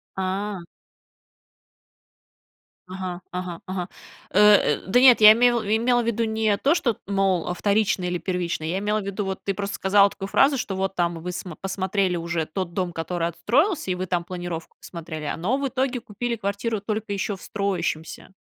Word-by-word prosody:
А. 190 0 -3 2.3
Ага, 185 -1 -5
ага, 180 -2 -5
ага. 185 -1 -4 0.4
Э, 190 - +2 0.4
э, - - -13
да 200 +6 +4
нет, 255 -2 +8
я 215 0 +10
име 245 +2 +4 0.3
имела 240 +2 +2
в - - -4
виду 230 0 0
не 220 -1 +1
то, 280 +9 +3
что 255 -9 +1
т - - -24
мол, 195 -3 +1
а - - 0
вторично 200 0 +1
или 180 0 -1
первично, 175 -3 -3
я 170 +4 -1
имела 210 +1 0
в - - -8
виду, 200 +1 -3
вот 190 0 -3
ты 195 - -1
просто 200 +1 -4
сказала 200 +1 +4
такую 195 0 -7
фразу, 275 +6 +4
что 200 -6 -3
вот 195 0 -2
там 170 -1 0
вы 180 +2 -5
смо 175 -2 -7
посмотрели 190 -1 -1
уже 170 -1 -2
тот 175 +2 -4
дом, 180 -2 -2
который 165 +1 -2
отстроился, 285 - +1
и - - 0
вы 185 +1 -3
там 175 -1 -1
планировку 175 -2 -6
посмотрели, 160 -3 -7
э, - - -2
но 200 +11 0
в 280 0 -1
итоге 260 0 -1
купили 235 +2 -4
квартиру 205 +2 -2
только 215 +1 -4
ещё 200 +1 -2
в 185 - -15
строящемся. 195 -6 -3
195 Hz, 190 wpm, -24 LUFS, 180-215 Hz, 2.3 s, я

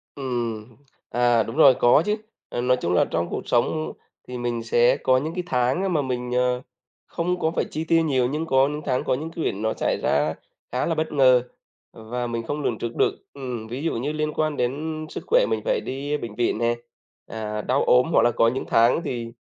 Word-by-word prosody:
Ừm, 120 -4 -4 0.3
à, 120 -2 +3
đúng 115 +3 -7
rồi, 140 -5 +7
có 120 +6 +5
chứ. 210 - +1 0.3
Ờ, 120 - -3
nói 125 +1 +2
chung 85 - 0
là - - +4
trong 85 +1 -1
cuộc - - -3
sống 140 +6 +1 0.4
thì 125 0 -6
mình 120 -1 -2
sẽ 120 +1 +3
có 130 - +3
những 155 +5 -2
cái 180 - -3
tháng 130 +10 +1
mà 155 - +2
mình, 125 -2 -3
ờ, 125 0 +1 0.5
không 180 +1 -2
có 160 - +1
phải - - -1
chi 155 - -3
tiêu 165 0 +3
nhiều 130 -5 +2
nhưng 150 +5 -2
có 135 -3 +3
những 150 +1 -4
tháng 130 -2 0
có - - 0
những 155 +5 -4
cái 165 - -4
việc - - 0
nó 110 +2 -1
xảy - - -1
ra 75 +2 +2 0.4
khá 125 - 0
là 165 - 0
bất 160 0 -2
ngờ 130 -4 +5 0.5
và 120 +2 -4
mình 115 -1 -3
không 145 +5 -3
lường 120 - -1
trước 115 +1 -5
được. - - +2 0.2
Ừm, 125 -5 -6
ví 125 +6 -5
dụ 165 - 0
như 135 +6 -2
liên 155 0 -2
quan 155 -1 -1
đến 155 +5 -2
sức - - -7
khỏe - - +4
mình - - 0
phải - - +1
đi 140 +3 -3
bệnh 115 -6 -7
viện 120 -2 0
nè, 120 +1 +1 0.5
à, 105 -1 -4
đau 130 +5 +1
ốm, 125 0 +5
hoặc - - +5
là 120 - +4
có 115 0 +3
những 130 +3 -1
tháng 115 +7 +4
thì 120 -6 -4
125 Hz, 230 wpm, -24 LUFS, 120-150 Hz, 0.5 s, rồi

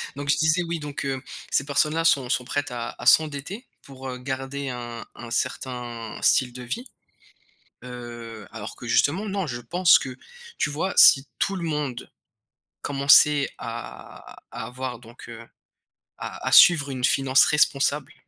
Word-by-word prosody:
donc 145 0 -6
je - - +3
disais 160 +2 +2
oui 170 -1 -4
donc 145 -2 -6
heu, 135 -1 -3 0.3
ces 135 - 0
personnes 150 +2 +1
là 165 - 0
sont 135 -6 +3
sont 125 -1 0
prêtes 145 +2 -3
à 120 -1 -5
à - - -8
s'endetter 155 - +2
pour, 135 -1 -11
heu, 125 - -6
garder 135 +1 -5
un 120 -2 -7
un 120 -1 -10
certain 120 -3 -4
style 125 -2 +3
de 125 0 -9
vie. 225 - -5 1.0
Heu, 120 -3 -9
alors 110 -1 -8
que 120 - -10
justement 160 - +1
non, 195 -2 -3
je 120 -4 -5
pense 175 +9 +4
que 130 -1 -7 0.4
tu - - 0
vois? 160 +6 -2
Si 135 +1 +7
tout 195 - -1
le 175 - -5
monde 150 -6 -4 0.7
commençait 140 +1 +5
à 115 0 -10
à 115 -1 -6
avoir 125 0 -6
donc 120 0 -14
heu, 115 -1 -10 0.8
à - - -8
à - - 0
suivre 155 -5 +7
une 130 -2 -6
finance 135 0 +4
responsable 145 -1 +1
135 Hz, 165 wpm, -24 LUFS, 125-150 Hz, 1.0 s, Si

